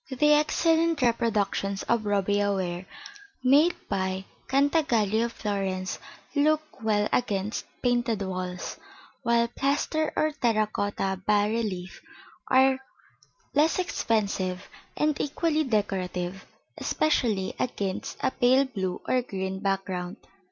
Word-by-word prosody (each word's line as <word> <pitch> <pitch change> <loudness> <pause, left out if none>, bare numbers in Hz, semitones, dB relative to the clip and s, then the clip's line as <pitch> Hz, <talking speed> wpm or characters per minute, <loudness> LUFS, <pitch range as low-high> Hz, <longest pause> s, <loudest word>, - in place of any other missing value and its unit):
The 295 +3 +4
excellent 320 0 +2
reproductions 210 -4 +1
of 230 -2 0
Robbia 205 0 +2
ware 180 -1 -3 0.6
made 290 +7 +5
by 190 0 -2 0.2
Cantagalli 265 -7 +2
of 235 - -2
Florence 195 -4 -2 0.3
look 310 0 +1
well 210 -1 +2
against 210 -3 -1 0.2
painted 240 -4 +1
walls; 185 -1 -4 0.4
while 235 -1 +3
plaster 285 +5 0
or 310 - +2
terra 230 -7 +2
cotta 200 -2 -2
bas 210 0 +3
reliefs 195 -5 -3 0.5
are 265 0 +4 0.7
less 300 +3 +3
expensive 200 - -1 0.3
and 300 -1 +1
equally 310 +2 0
decorative, 195 -5 -2 0.3
especially 230 -11 +1
against 200 -6 -3
a - - +2
pale 260 +2 +4
blue 190 -8 -3
or 255 - +2
green 190 -4 -4
background. 195 -1 -2
215 Hz, 110 wpm, -27 LUFS, 195-270 Hz, 0.7 s, made